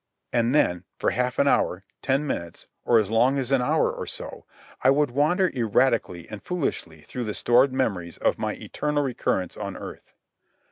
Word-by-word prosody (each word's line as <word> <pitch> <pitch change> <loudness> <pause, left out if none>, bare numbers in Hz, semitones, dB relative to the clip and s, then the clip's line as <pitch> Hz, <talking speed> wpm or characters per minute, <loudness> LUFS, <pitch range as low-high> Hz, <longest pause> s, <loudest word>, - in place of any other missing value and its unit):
And 120 +3 +2
then, 90 - +2
for - - +1
half 125 0 -1
an 140 - +3
hour, 95 -8 +2 0.2
ten 135 +2 +1
minutes, 85 - -5 0.2
or 120 - +5
as 110 -2 +1
long 125 +5 +3
as 135 -1 -2
an 135 -2 +4
hour 125 - +2
or - - -6
so, - - -7 0.4
I 130 - +6
would 145 -1 +3
wander 160 +7 +2
erratically 115 -7 +1
and 105 -1 -8
foolishly 110 - -3
through 120 - -5
the 105 - -3
stored 125 +3 +4
memories 100 -11 -2
of - - 0
my - - -1
eternal 150 -1 -2
recurrence 105 -8 -1
on - - -5
earth. - - -10
125 Hz, 180 wpm, -25 LUFS, 105-140 Hz, 0.4 s, I